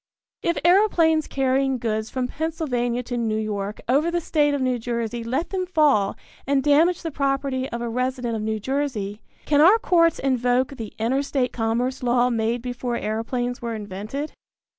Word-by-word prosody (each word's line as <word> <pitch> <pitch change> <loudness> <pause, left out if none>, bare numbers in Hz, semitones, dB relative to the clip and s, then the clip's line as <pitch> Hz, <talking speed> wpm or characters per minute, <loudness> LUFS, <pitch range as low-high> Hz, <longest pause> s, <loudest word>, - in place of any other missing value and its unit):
If 340 - 0
aeroplanes 345 -5 +4
carrying 270 0 +1
goods 220 -2 -2
from 255 -1 -2
Pennsylvania 250 -6 -2
to 245 0 -4
New 220 -2 0
York 210 -1 -3
over 285 +7 +3
the 345 0 0
State 295 -3 +1
of - - -2
New 255 -2 0
Jersey 235 0 -3
let 265 +9 -2
them 370 -1 -2
fall 290 - +2 0.3
and 275 -1 +2
damage 320 +5 +3
the 325 - -3
property 275 -2 -1
of 235 0 -4
a - - -2
resident 250 0 -2
of 220 - -3
New 220 0 -2
Jersey, 225 -5 -2 0.2
can 295 -1 +3
our 375 +8 +7
courts 335 -6 +3
invoke 250 -1 +1
the 225 -5 -8
Interstate 260 +2 0
Commerce 240 +3 -1
Law 245 0 +2
made 230 +1 -1
before 245 -1 -3
aeroplanes 245 +3 -2
were 235 -1 -3
invented? 210 +8 -5
255 Hz, 165 wpm, -23 LUFS, 230-290 Hz, 0.3 s, our